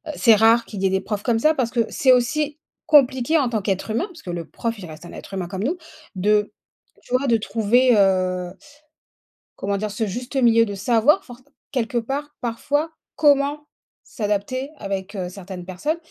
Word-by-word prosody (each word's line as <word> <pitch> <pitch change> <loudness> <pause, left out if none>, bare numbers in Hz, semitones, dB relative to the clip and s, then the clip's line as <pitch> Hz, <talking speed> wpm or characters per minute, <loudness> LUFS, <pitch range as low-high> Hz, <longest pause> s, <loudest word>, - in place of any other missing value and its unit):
«C'est 230 -3 +6
rare 225 +2 +5
qu'il 205 -4 -7
y - - +3
ait - - +4
des 190 0 +1
profs 210 -2 -4
comme 230 -2 +1
ça», 305 +6 +4
parce 245 -4 -1
que 240 - +1
c'est 260 - +3
aussi, 295 +5 0 0.3
compliqué 270 0 +4
en 275 -5 +1
tant 220 -3 -1
qu'être 195 +1 -2
humain, 230 +11 0
parce 350 -5 -14
que - - -10
le 170 -1 -4
prof 230 +7 -4
il 190 - -8
reste 160 +1 -11
un - - -10
être - - -11
humain 185 -2 -3
comme 190 +1 -4
nous, 315 +8 0 0.4
de 210 +2 +2 0.5
tu - - -9
vois? 270 +2 +1
de 235 - +4
trouver, 230 +3 +2
heu 185 -2 +1 1.1
comment 200 0 -1
dire? 210 +1 -3
Ce 215 +2 -2
juste 245 +7 -6
milieu 230 -3 +5
de 205 - -5
savoir 235 - +3
forc 245 0 -13 0.3
quelque 240 -2 -1
part 280 +5 -3
parfois, 285 +7 -1 0.2
comment 290 0 +2 0.4
s'adapter 215 +5 -3
avec, 195 0 -5
heu, 185 -2 -3
certaines 185 -1 -9
personnes. 190 - -2
230 Hz, 195 wpm, -22 LUFS, 195-260 Hz, 1.1 s, C'est